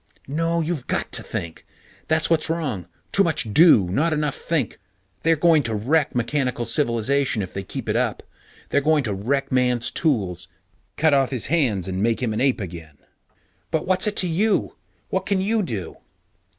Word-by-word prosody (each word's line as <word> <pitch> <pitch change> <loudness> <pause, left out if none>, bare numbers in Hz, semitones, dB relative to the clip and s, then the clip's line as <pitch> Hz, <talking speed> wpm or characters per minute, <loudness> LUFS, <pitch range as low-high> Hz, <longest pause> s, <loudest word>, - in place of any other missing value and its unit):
_ - - -43 0.2
No, 165 +4 0
you've 160 -5 -3
got - - -2
to - - +2
think. 85 -1 -6 0.4
That's 160 0 +2
what's 160 -1 +1
wrong. 135 - -2 0.2
Too 195 - +3
much 125 - -1
do, 155 - +6
not 155 - +1
enough 150 -2 0
think. 155 -9 -2 0.4
They're 165 0 +3
going 160 -1 +4
to 115 -5 -2
wreck 140 +8 +1
mechanical 125 0 -1
civilization 120 -1 0
if 95 - -8
they 95 - -3
keep 95 - -7
it - - 0
up. - - 0 0.5
They're 145 - +2
going 150 0 +2
to 105 -4 -2
wreck 135 +8 -1
Man's 125 -2 +1
tools, 95 - -1 0.5
cut 155 -1 +3
off 135 -2 +3
his 130 -5 -2
hands, 115 - +1
and 95 0 -3
make 115 +1 +1
him 115 -3 0
an 110 - -2
ape 135 -2 +2
again! 80 -5 -8 0.7
But 160 -1 -1
what's 185 +3 +2
it 210 - 0
to 185 - +1
you? 175 - +1 0.3
What 190 0 -2
can 200 -2 +1
you 215 +3 +1
do? 110 - -4
140 Hz, 185 wpm, -23 LUFS, 110-160 Hz, 0.7 s, do